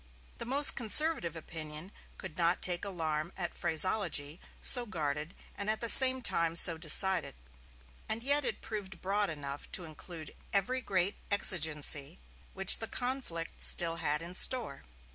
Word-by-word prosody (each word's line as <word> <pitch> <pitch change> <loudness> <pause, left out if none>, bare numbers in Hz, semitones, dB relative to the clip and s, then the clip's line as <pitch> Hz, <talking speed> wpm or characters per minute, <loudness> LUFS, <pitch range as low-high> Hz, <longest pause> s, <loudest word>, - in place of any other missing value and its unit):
The - - -8
most 280 +3 +5
conservative 240 - +4
opinion 160 +2 -8 0.3
could 190 -5 -11
not 170 +1 -2
take 175 -1 -3
alarm 165 -4 -6
at 175 -3 -6
phraseology 170 -2 -2 0.2
so 245 -2 +4
guarded 155 -2 -6 0.2
and 200 +1 -7
at 220 - -2
the 235 - -4
same 260 0 +9
time 165 -5 -2
so 170 0 +4
decided; 170 - +1 0.7
and 225 +1 -3
yet 285 +2 -1
it - - -6
proved 190 -5 -10
broad 200 +2 -3
enough 145 -2 -10
to 180 - -4
include 155 0 -12 0.2
every 245 +6 -3
great 195 -3 -4
exigency 155 -6 0 0.4
which 195 -1 +6
the 225 - -8
conflict 245 -11 -8
still 165 -1 -1
had 150 0 -4
in 175 +1 -8
store. 245 - -1
180 Hz, 145 wpm, -28 LUFS, 160-215 Hz, 0.7 s, same